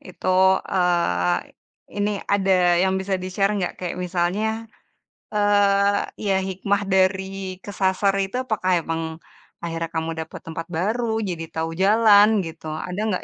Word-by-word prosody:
Itu, 185 Hz, +1 st, +2 dB
eee, 170 Hz, -, +1 dB, 0.6 s
ini 205 Hz, +1 st, +1 dB
ada 195 Hz, -1 st, +2 dB, 0.3 s
yang 190 Hz, 0 st, +2 dB
bisa 190 Hz, 0 st, -2 dB
di-share 195 Hz, +2 st, 0 dB
gak? 180 Hz, -, -2 dB
Kayak 180 Hz, 0 st, -4 dB
misalnya, 180 Hz, +4 st, 0 dB, 0.9 s
eee, 205 Hz, -1 st, +3 dB, 0.3 s
ya 195 Hz, -, +3 dB
hikmah 200 Hz, +2 st, -1 dB
dari 190 Hz, 0 st, 0 dB
kesasar 195 Hz, 0 st, +1 dB
itu, 195 Hz, +4 st, -4 dB
apakah 200 Hz, -5 st, -1 dB
emang 165 Hz, 0 st, -2 dB, 0.6 s
akhirnya 165 Hz, 0 st, -3 dB
kamu 160 Hz, 0 st, -1 dB
dapat 160 Hz, 0 st, -7 dB
tempat 165 Hz, 0 st, -6 dB
baru, 220 Hz, +6 st, -1 dB
jadi 165 Hz, -4 st, -4 dB
tahu 165 Hz, 0 st, -2 dB
jalan, 210 Hz, 0 st, +5 dB
gitu? 165 Hz, -1 st, -9 dB
Ada 160 Hz, +5 st, -5 dB, 0.2 s
gak -, -, -13 dB
190 Hz, 130 wpm, -23 LUFS, 175-200 Hz, 0.9 s, jalan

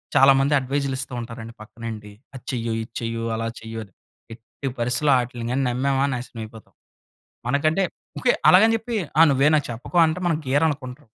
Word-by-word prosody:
చాలా 135 Hz, 0 st, +7 dB
మంది 140 Hz, +2 st, +2 dB
అడ్వైస్‌లు 135 Hz, +1 st, -2 dB
ఇస్తూ 135 Hz, -1 st, -5 dB
ఉంటారండి 115 Hz, -1 st, -8 dB
పక్కనుండి. 110 Hz, -1 st, -8 dB, 0.2 s
"అది 130 Hz, -, -10 dB
చెయ్యు! 115 Hz, -2 st, -2 dB
ఇది 110 Hz, -, -13 dB
చెయ్యు! 115 Hz, -1 st, -3 dB
అలా 115 Hz, 0 st, -3 dB
చెయ్యు!" 115 Hz, 0 st, -7 dB
అని 100 Hz, -, -18 dB, 0.4 s
ఎట్టి 115 Hz, +4 st, -9 dB
పరిసి‌లో 125 Hz, +5 st, +1 dB
వాటిలిని 120 Hz, 0 st, -3 dB
నమ్మామా 135 Hz, +2 st, +1 dB
నాశనం 120 Hz, -2 st, -6 dB
అయిపోతాం. 110 Hz, 0 st, -13 dB, 0.8 s
మనకంటే 155 Hz, +8 st, +2 dB, 0.3 s
ఓకే. 250 Hz, -, +3 dB, 0.2 s
అలాగని 220 Hz, +5 st, +7 dB
చెప్పి 225 Hz, +1 st, -4 dB, 0.2 s
ఆ -, -, +10 dB
నువ్వే 140 Hz, +1 st, +4 dB
నాకు 150 Hz, -2 st, +2 dB
చెప్పకో 120 Hz, +9 st, -3 dB
అంటే 160 Hz, +2 st, -1 dB
మనం 165 Hz, -3 st, +2 dB
గీర 135 Hz, +3 st, +2 dB
అనుకుంటాం. 135 Hz, -2 st, -6 dB
125 Hz, 165 wpm, -23 LUFS, 115-145 Hz, 0.8 s, ఆ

